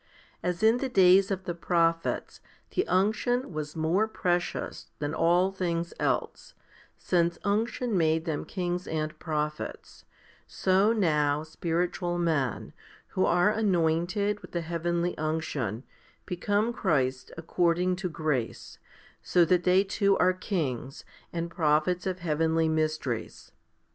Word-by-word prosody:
As 180 +2 -2
in 225 +2 +5
the 265 +1 -2
days 190 -3 +5
of 190 -1 -2
the 175 - -3
prophets 165 -1 0 0.3
the 375 - 0
unction 215 +4 +1
was 150 -1 -5
more 165 +7 +1
precious 175 -5 -2
than 145 +1 -3
all 175 +4 +3
things 170 -3 -2
else, - - -2 0.4
since 170 -1 +1
unction 220 +3 0
made 160 -2 +2
them 155 -3 -2
kings 180 -1 -3
and 155 -1 -3
prophets, 150 -1 -4 0.4
so 190 +3 +2
now 150 -8 +1
spiritual 175 +2 -2
men, 155 - -1 0.4
who 185 - +1
are 175 +4 +4
anointed 195 0 +1
with - - -14
the 175 - -1
heavenly 170 +1 -1
unction, 150 -8 -2 0.4
become 205 +6 0
Christs 130 - 0
according 175 +2 +1
to 185 -1 -3
grace, 150 -7 -3 0.4
so 175 -2 +3
that 180 +1 +2
they 185 +2 +5
too 200 0 +1
are 185 0 +4
kings, 145 - -3 0.3
and 170 0 -3
prophets 160 +3 +1
of 185 -1 -3
heavenly 160 0 +1
mysteries. 155 -7 -2
175 Hz, 125 wpm, -28 LUFS, 160-185 Hz, 0.4 s, in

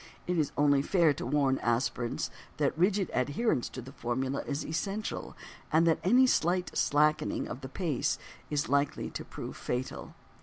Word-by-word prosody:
It 180 -1 0
is 150 - +1
only 145 -1 +4
fair 165 0 +3
to 130 - -5
warn 135 -1 +2
aspirants 120 0 -1 0.3
that - - +1
rigid 190 +3 +2
adherence 145 - +1
to 130 - -7
the 130 - -10
formula 130 +2 -2
is 145 +1 -2
essential 195 +6 -3 0.3
and 165 +1 +4
that 165 -1 +3
any 245 +8 +6
slight 180 -6 +1
slackening 150 +1 +2
of 130 - -6
the 130 - -7
pace 155 -4 -1 0.3
is 150 -1 0
likely 140 +2 0
to - - -5
prove - - -7
fatal. 125 +1 -4
145 Hz, 160 wpm, -30 LUFS, 135-175 Hz, 0.3 s, any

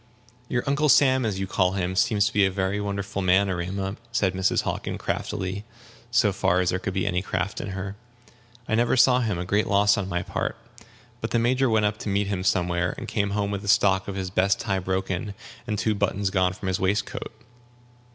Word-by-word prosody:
"Your 120 - 0
Uncle 140 +2 +1
Sam, 130 -3 +5
as 100 -3 -2
you 95 - -1
call 95 0 +1
him, 95 -1 -2
seems 100 +2 +3
to 105 - -1
be 105 - +4
a 95 - +4
very 95 +2 -1
wonderful 100 -1 -3
man, 95 +2 +3
Erema," 95 +2 -3
said 105 -6 +1
Mrs. 95 +1 +1
Hockin, - - -3
craftily, 95 +2 -3 0.5
so 110 -4 +3
far 95 -1 +2
as 90 -1 +1
there 90 - -1
could 95 0 -4
be 95 - 0
any 90 -2 0
craft 90 +1 -3
in - - -5
her; 95 +1 -5 0.7
"I - - -2
never 120 +3 +2
saw 125 0 +5
him 110 -7 -1
a 90 - -3
great 100 +3 +1
loss 100 0 +4
on 95 -1 -3
my 90 -1 -1
part. - - -3 0.6
But - - -2
the - - +1
Major 125 +3 +2
went 110 -2 +3
up 105 +1 -1
to - - -4
meet 100 +1 +1
him 100 -2 -2
somewhere, 90 -2 +1
and 120 - -6
came 100 -3 -1
home 100 0 -1
with 100 -1 -3
the 100 - -9
stock 95 -1 +3
of 100 - -4
his 95 -1 -4
best 95 +1 +2
tie 100 -4 -1
broken, 95 +2 -2 0.3
and 105 -2 -1
two 110 +1 +1
buttons 100 -1 -1
gone 95 -1 +2
from 95 0 -5
his 95 - -1
waistcoat. 100 +3 -1
100 Hz, 220 wpm, -25 LUFS, 95-105 Hz, 0.7 s, Sam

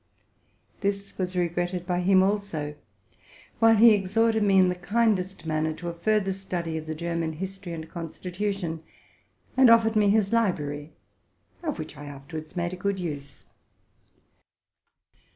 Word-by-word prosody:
This 200 0 -2
was 185 0 -2
regretted 175 0 -1
by 180 -1 0
him 185 +1 +5
also; 195 -7 -1 0.9
while 225 0 +6
he 225 +1 +8
exhorted 220 +3 +2
me 200 -2 +4
in 185 -1 +6
the - - +1
kindest 195 -1 0
manner 155 0 0
to 175 +2 -6
a - - -5
further 195 +3 +1
study 180 -4 -4
of 160 0 -5
the 155 - -3
German 170 0 -2
history 190 +1 -6
and 160 -1 -6
consti 170 +2 -7
tution, 195 -5 -2 0.8
and 260 -2 +7
offered 225 -1 +5
me 210 -1 +4
ee 215 +2 +5
library, 160 -9 -1 0.7
of 310 -4 -3
which 155 -2 -7
I 145 - -9
afterwaids 155 +3 -8
made 175 0 -2
a - - -5
good 200 +1 -1
use. 145 -5 -6
180 Hz, 150 wpm, -26 LUFS, 165-200 Hz, 0.9 s, he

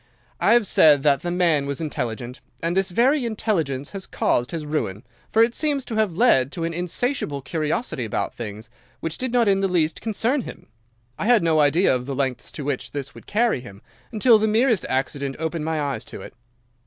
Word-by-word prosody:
I - - +4
have 235 -2 +4
said 150 -6 +5
that 140 -2 +4
the 175 - -3
man 170 -5 +2
was 140 -1 -3
intelligent, 125 -5 -4 0.2
and 170 +1 0
this 190 0 +1
very 255 +9 +2
intelligence 165 - -2
has 195 -2 -7
caused 120 +1 0
his 165 -3 -5
ruin, 115 -10 -3 0.3
for 225 - +4
it 235 +1 +1
seems 290 -3 -1
to 225 - -5
have 210 -6 0
led 140 - +4
to 170 - -4
an 165 0 -2
insatiable 175 - -2
curiosity 155 - -2
about 110 - -2
things 110 0 -8 0.3
which 165 +3 -4
did 255 -1 -2
not 240 -2 +3
in 195 -1 +3
the 195 - +1
least 170 -4 0
concern 230 +5 0
him. - - -10 0.5
I 210 - -1
had 235 -6 +5
no 160 -2 +3
idea 150 +5 +4
of 125 0 -4
the 140 - -3
lengths 130 -2 -2
to 150 - -6
which 140 -3 -3
this 140 -1 -5
would - - -14
carry 225 - +1
him, 100 -5 -13 0.3
until 225 0 +5
the 220 - +1
merest 225 -2 +2
accident 135 +1 -2
opened 160 -1 -3
my 160 -1 -1
eyes 140 -6 -2
to - - -9
it. - - -11
165 Hz, 205 wpm, -23 LUFS, 140-220 Hz, 0.5 s, said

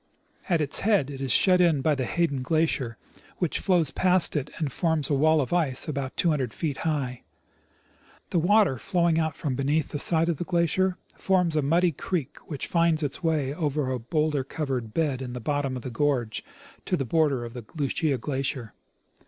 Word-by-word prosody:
At 170 -3 +2
its 145 -1 +2
head 200 -10 +2
it 135 -1 -7
is 135 -2 -1
shut 180 +5 +5
in 165 -6 +3
by 155 - +3
the 130 -3 -2
Hayden 155 -6 0
glacier, 135 -5 0 0.4
which 175 -4 0
flows 175 -7 +2
past 185 -3 +3
it 145 -3 -1
and 150 -4 -2
forms 160 -2 0
a - - +3
wall 155 +3 +4
of 135 - -3
ice 155 -8 +1
about 140 -3 -4
two 170 - +3
hundred 130 -7 -2
feet 145 -5 -2
high. 140 -6 -2 1.1
The 175 - +2
water 185 - +3
flowing 170 - +1
out 160 -2 -1
from 145 -4 -3
beneath 140 +4 0
the 145 - -3
side 165 +2 +3
of 170 -3 0
the - - -3
glacier 180 +1 +1 0.2
forms 180 -4 +1
a 155 - +3
muddy 170 +5 +2
creek, 160 -1 -4
which 145 -5 -4
finds 165 -2 +2
its 145 +3 -3
way 155 -5 0
over 150 -4 -1
a 130 - -2
bowlder 150 +3 0
covered 130 -5 -4
bed 140 -2 -1
in 125 -2 -5
the 125 - -5
bottom 140 +1 -1
of 125 - -6
the 130 - -5
gorge 120 -3 -1 0.4
to - - 0
the 135 - -2
border 140 -3 +1
of 115 +1 -9 0.2
Lucia 145 -1 0
glacier. 130 -3 -2
150 Hz, 195 wpm, -26 LUFS, 135-165 Hz, 1.1 s, shut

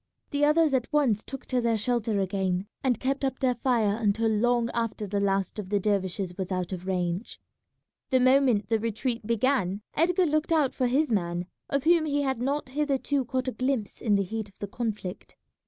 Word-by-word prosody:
The 285 0 0
others 300 0 +4
at 255 0 0
once 265 -9 +2
took 270 - -8
to 255 -2 0
their 230 -1 +1
shelter 220 -1 0
again, 190 -1 -1 0.2
and 255 -4 +1
kept 275 +2 -1
up 265 -1 0
their 255 -2 +2
fire 230 -4 +1
until 220 +1 +2
long 235 +2 +2
after 230 -2 -2
the 200 0 -1
last 195 +1 0
of 190 -3 -6
the 205 0 +2
dervishes 190 -2 -1
was 190 0 -3
out 185 -1 -2
of 185 0 -6
range. 180 +2 -2 0.7
The 260 - +3
moment 255 -5 +4
the 225 +1 +1
retreat 230 +1 -2
began 230 -4 +1
Edgar 360 +3 +2
looked 310 +1 0
out 305 -5 +3
for 255 - 0
his 275 +3 +1
man, 175 -3 0 0.2
of 280 -1 0
whom 335 -1 +4
he 290 -1 +1
had 265 -3 -1
not 275 +1 -1
hitherto 280 -1 0
caught 255 +1 -2
a - - +1
glimpse 255 -5 -2
in 210 -3 +2
the 200 - +2
heat 220 +2 -5
of 195 - -26
the - - -4
conflict. 210 -3 -5
235 Hz, 200 wpm, -27 LUFS, 200-270 Hz, 0.7 s, others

